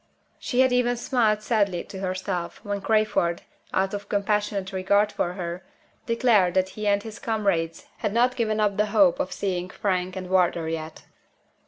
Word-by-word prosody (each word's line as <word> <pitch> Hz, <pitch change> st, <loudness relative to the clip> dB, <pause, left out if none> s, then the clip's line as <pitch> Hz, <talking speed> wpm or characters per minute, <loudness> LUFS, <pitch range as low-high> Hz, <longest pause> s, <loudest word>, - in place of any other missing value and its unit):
She 250 Hz, 0 st, +1 dB
had 260 Hz, -1 st, +4 dB
even 245 Hz, -1 st, +2 dB
smiled 230 Hz, -4 st, +1 dB
sadly 200 Hz, -6 st, +1 dB
to 190 Hz, -, -9 dB
herself, 185 Hz, -2 st, -3 dB
when 205 Hz, -1 st, -2 dB
Crayford 215 Hz, -6 st, +1 dB, 0.3 s
(out 190 Hz, +1 st, 0 dB
of 205 Hz, 0 st, -5 dB
compassionate 205 Hz, -1 st, -1 dB
regard 200 Hz, +2 st, +2 dB
for 175 Hz, -, -2 dB
her) 175 Hz, -1 st, -5 dB, 0.4 s
declared 230 Hz, -7 st, +3 dB
that 185 Hz, 0 st, +2 dB
he 210 Hz, +2 st, -5 dB
and 200 Hz, 0 st, +2 dB
his 220 Hz, 0 st, -8 dB
comrades 195 Hz, -7 st, -1 dB
had 210 Hz, -, -2 dB
not 245 Hz, +3 st, +2 dB
given 220 Hz, -3 st, 0 dB
up 205 Hz, -2 st, +1 dB
the 210 Hz, 0 st, +2 dB
hope 205 Hz, -4 st, +4 dB
of 185 Hz, -, -2 dB
seeing 185 Hz, -2 st, -2 dB
Frank 185 Hz, -1 st, -1 dB
and 185 Hz, -1 st, -5 dB
Wardour 175 Hz, -3 st, +2 dB
yet. 160 Hz, -1 st, -5 dB
200 Hz, 170 wpm, -25 LUFS, 185-215 Hz, 0.4 s, had